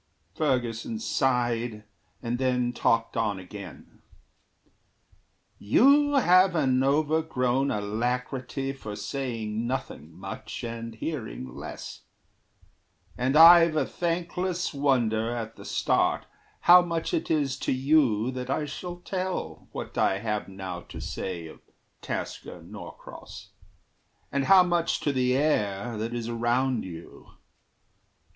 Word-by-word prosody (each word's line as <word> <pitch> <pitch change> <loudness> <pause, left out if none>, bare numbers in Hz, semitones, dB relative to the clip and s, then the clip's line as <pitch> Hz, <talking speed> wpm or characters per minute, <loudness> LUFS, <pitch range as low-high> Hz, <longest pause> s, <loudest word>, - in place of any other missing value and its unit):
Ferguson 125 - -1
sighed, 120 - 0 0.4
and 120 +1 -2
then 125 -2 +1
talked 115 -1 +1
on 110 -3 0
again: 95 +1 -11 1.6
"You 285 - +4
have 185 -6 +5
an 130 -5 +2
overgrown 140 -3 +1
alacrity 125 +5 -2
For 110 -6 -7
saying 115 -1 -3
nothing 120 - -4
much 95 +8 -8
and 115 -1 -6
hearing 110 - -5
less; - - -8 1.1
And 130 +4 +1
I've 165 0 +9
a 150 -3 +2
thankless 175 +2 -2
wonder, 120 -6 +1
at 115 -1 -5
the - - -12
start, - - +1 0.4
How 180 +1 +8
much 170 - -3
it 335 - -1
is 145 -4 +1
to - - -1
you 130 -4 +2
that 125 0 -6
I 150 +3 0
shall 175 +4 -6
tell 185 0 -4
What - - -5
I 95 - +3
have 105 0 -3
now 95 -2 -6
to - - -10
say 90 -3 -5
of 80 - -11 0.4
Tasker - - -5
Norcross, - - -11 0.8
And 140 -1 0
how 190 -1 +7
much 175 -2 0
to 145 - 0
the 130 0 +2
air 115 -6 0
that 115 +2 -3
is 115 -1 -3
around 120 +1 0
you. 85 -2 -11
125 Hz, 120 wpm, -27 LUFS, 110-155 Hz, 1.6 s, I've